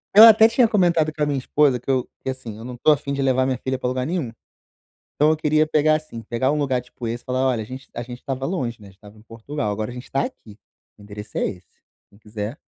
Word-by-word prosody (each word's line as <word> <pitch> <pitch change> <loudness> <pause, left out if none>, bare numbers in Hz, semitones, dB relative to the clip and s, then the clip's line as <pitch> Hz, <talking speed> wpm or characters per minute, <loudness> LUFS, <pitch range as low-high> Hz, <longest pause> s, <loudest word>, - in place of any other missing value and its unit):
Ela 225 +2 +12
até 220 0 +7
tinha 235 +1 +3
comentado 175 -7 +2
com 150 0 -2
a - - +3
minha 145 -2 -1
esposa 135 -1 +2
que - - -11
eu 130 -2 +1
que, - - -4
assim, 130 -4 -6
não 125 0 -7
tô 155 - +4
afim 140 -1 0
de 140 - -2
levar 130 -1 +2
minha 130 -1 -1
filha 130 +1 -3
para 125 - -2
lugar 130 0 -2
nenhum. 160 -7 -2 0.8
Então, 150 +2 +3
eu 155 - +2
queria 155 0 +2
pegar, 155 0 +3
assim, 155 -7 -8
pegar 120 +4 -1
um 150 - 0
lugar, 135 -4 0
tipo, 125 -1 -9
esse, 115 +1 -4
e - - -38
falar: 130 +1 0
"Olha, 120 -4 0
a - - -7
gente 130 +2 -9
a 120 - -4
gente 120 0 -8
estava 135 0 -4
longe, 130 - -3
né, 105 - -13
gente 95 - -18
estava 105 +1 -16
em 105 - -17
Portugal. 115 +1 -5
Agora 105 +2 -3
a - - -10
gente 125 0 -10
tá 135 - +1
aqui, 105 -2 -10 0.4
o 105 - -15
endereço 105 +1 -8
é - - +1
esse, 90 -3 -9 0.3
quem 100 - -21
quiser, 110 +4 -6
130 Hz, 270 wpm, -22 LUFS, 115-150 Hz, 0.8 s, Ela